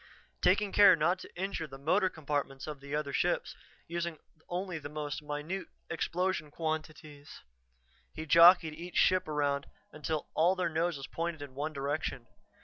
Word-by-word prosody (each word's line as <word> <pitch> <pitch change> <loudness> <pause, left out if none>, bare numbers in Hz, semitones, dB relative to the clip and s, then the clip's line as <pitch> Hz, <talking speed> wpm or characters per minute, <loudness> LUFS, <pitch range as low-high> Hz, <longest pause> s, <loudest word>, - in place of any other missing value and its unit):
Taking 210 -2 +3
care 205 -1 +8
not 170 +4 +1
to - - -12
injure 190 -4 -2
the 135 -2 -10
motor 185 +7 +2
compartments 145 -4 -3
of 150 -2 -6
the 140 +1 -5
other 145 -2 -2
ships, - - 0 0.3
using 170 -1 -3 0.3
only 180 -1 -3
the 145 -1 -7
most 150 0 -4
minute 150 +5 -4 0.2
explosion 175 -1 -1
quantities, 155 -2 -5 0.7
he 160 - -6
jockeyed 165 +1 +7
each 175 +3 -9
ship 185 0 +4
around 145 -2 0 0.2
until 155 0 -3
all 175 +4 +3
their 185 -2 0
noses 160 -3 -1
pointed 165 0 -4
in 140 -2 -10
one 145 +4 -3
direction. 140 -3 -3
155 Hz, 150 wpm, -31 LUFS, 145-175 Hz, 0.7 s, care